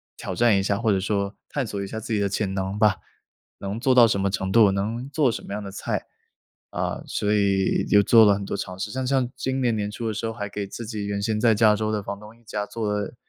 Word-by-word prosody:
挑 - - -5
战 115 -4 +4
一 95 - +1
下， 100 0 0
或 115 -1 0
者 95 - +2
说 100 0 -1
探 140 -4 -2
索 100 -1 -4
一 100 - -5
下 110 +2 -5
自 110 - -5
己 105 - +1
的 100 -1 +1
潜 95 0 -2
能 95 +1 -3
吧， 105 -3 +4 0.6
能 100 +2 -4
做 130 +2 +3
到 120 -2 +8
什 100 -4 0
么 100 - +1
程 95 -1 -2
度， 105 -2 +6
能 110 +7 -3
做 145 -2 +2
什 - - -6
么 - - -6
样 105 +1 -4
的 100 - -7
菜。 95 - -3 0.7
啊， - - -3
所 105 0 0
以 100 -2 +2
又 100 0 +6
做 115 +1 +7
了 100 -1 +5
很 100 - -5
多 - - -3
尝 90 -2 -5
试， 105 +2 -4
像 130 +3 -3
像 130 -2 +2
今 130 0 -2
年 120 -3 +1
年 105 -1 -2
初 115 +2 -5
的 110 - -1
时 110 +2 -3
候， - - -2
还 105 -2 -5
给 100 0 -5
自 115 +3 -7
己 105 -2 -4
原 100 0 -2
先 105 +1 -1
在 115 -1 +4
加 105 0 +5
州 110 0 -1
的 105 -2 -2
房 100 +1 -5
东 105 +2 -13
一 - - -27
家， 105 -2 -3
做 110 -3 -2
了 105 +3 -3
105 Hz, 300 characters per minute, -24 LUFS, 100-115 Hz, 0.7 s, 到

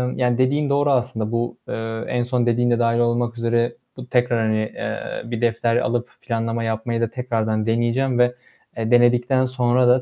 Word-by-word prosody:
yani 125 -1 +1
dediğin 140 +3 +1
doğru 145 0 +2
aslında. 120 -4 -1
Bu, 115 +1 -2
eee, 115 +1 -4
en 120 -1 0
son 125 0 0
dediğin 120 +1 +2
de 120 - +2
dâhil 115 0 +2
olmak 120 0 0
üzere 115 +1 0 0.2
bu 125 -1 -9
tekrar, 125 -1 +1
hani, 110 0 +1 0.2
eee, - - -4
bir 115 0 -3
defter 115 0 +1
alıp 120 0 -1
planlama 115 -1 -2
yapmayı 115 +1 -2
da 115 - +2
tekrardan 110 -4 -1
deneyeceğim 120 +3 +1
ve, 125 0 +3 0.4
eee, 115 +1 -2
denedikten 120 +2 +4
sonra 125 -1 +2
da 125 +1 +5
120 Hz, 180 wpm, -21 LUFS, 115-125 Hz, 0.4 s, da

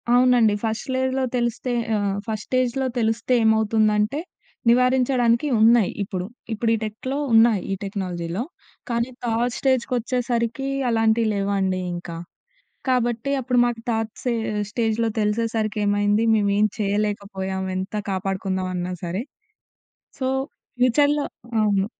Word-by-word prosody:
అవునండి. 245 -4 +5
ఫస్ట్ 220 +3 -2
లెజ్‌లో 260 0 0
తెలిస్తే 240 +1 -1 0.2
ఆహ్, 200 -1 0
ఫస్ట్ 215 -1 -3
స్టేజ్‌లో 255 +1 0
తెలిస్తే 225 +2 +1
ఏమవుతుందంటే 220 +3 +2 0.5
నివారించడానికి 250 +1 +3
ఉన్నాయి 225 -2 +5
ఇప్పుడు. 185 -2 -4 0.3
ఇప్పుడు 225 +1 0
ఈ - - -1
టెక్‌లో 240 +6 -4 0.2
ఉన్నాయి, 225 -3 +5
ఈ - - +1
టెక్నాలజీలో. 185 -1 -3 0.5
కానీ 235 +1 0 0.2
థర్డ్ 235 +1 0
స్టేజ్‌‌కొచ్చేసరికి 250 -1 0 0.2
అలాంటివి 225 0 +2
లేవండి 195 -2 0 0.2
ఇంకా. 175 -1 -7 0.7
కాబట్టి 240 0 +1
అప్పుడు 250 0 0
మాకు 240 -1 -1
థాట్ 225 -1 -1
సే 245 - +1 0.4
స్టేజ్‌లో 225 0 0
తెలిసేసరికి 215 0 0
ఏమైంది 205 +2 +2
మేము 205 -2 +2
ఏం 210 - +5
చేయలేకపోయాం 200 -2 -2
ఎంత 190 +3 -4 0.2
కాపాడుకుందాం 190 -1 -2
అన్నా 180 0 -3
సరే. 180 +6 -2 1.0
సో 260 - -1 0.5
ఫ్యూచర్‌లో 285 +4 +3 0.4
అవును. 200 -2 +2
225 Hz, 115 wpm, -23 LUFS, 205-245 Hz, 1.0 s, అవునండి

